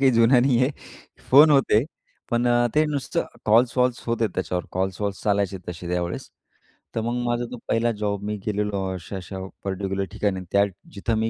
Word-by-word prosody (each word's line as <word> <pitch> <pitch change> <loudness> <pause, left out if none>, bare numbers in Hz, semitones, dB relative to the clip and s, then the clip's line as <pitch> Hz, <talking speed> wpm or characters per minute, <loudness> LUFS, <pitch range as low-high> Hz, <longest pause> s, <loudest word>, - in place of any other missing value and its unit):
काही 135 -1 +5
जुन्या 115 +2 +5
नाही 130 -2 +3
आहे. 130 - +3 0.6
फोन 145 +4 +8
होते. 135 -4 +4 0.5
पण 120 +1 +1
अ, 120 0 +4
ते 155 +1 +4
नुसतं, 150 +3 -1 0.2
कॉल-वॉल्स 120 +2 +3
होतेत 115 -2 +1
त्याच्यावर, 90 -1 -2
कॉल्स-वॉल्स 95 +2 -2
चालायचे 100 -2 +1
तसे 85 0 -6
त्यावेळेस. 90 0 -3 0.7
तर 115 - 0
मग 120 +2 -2
माझा 120 0 0
तो 125 - -6
पहिला 115 +1 +2
जॉब 100 -1 -2
मी 105 - -1
गेलेलो 105 -1 -1
अशा-अशा 95 +1 -7 0.2
पर्टिक्युलर 95 0 -2
ठिकाणी 100 -3 -1
त्या, 100 0 +5 0.3
जिथं 110 +3 -1
मी 110 +1 +1
110 Hz, 165 wpm, -24 LUFS, 100-120 Hz, 0.7 s, फोन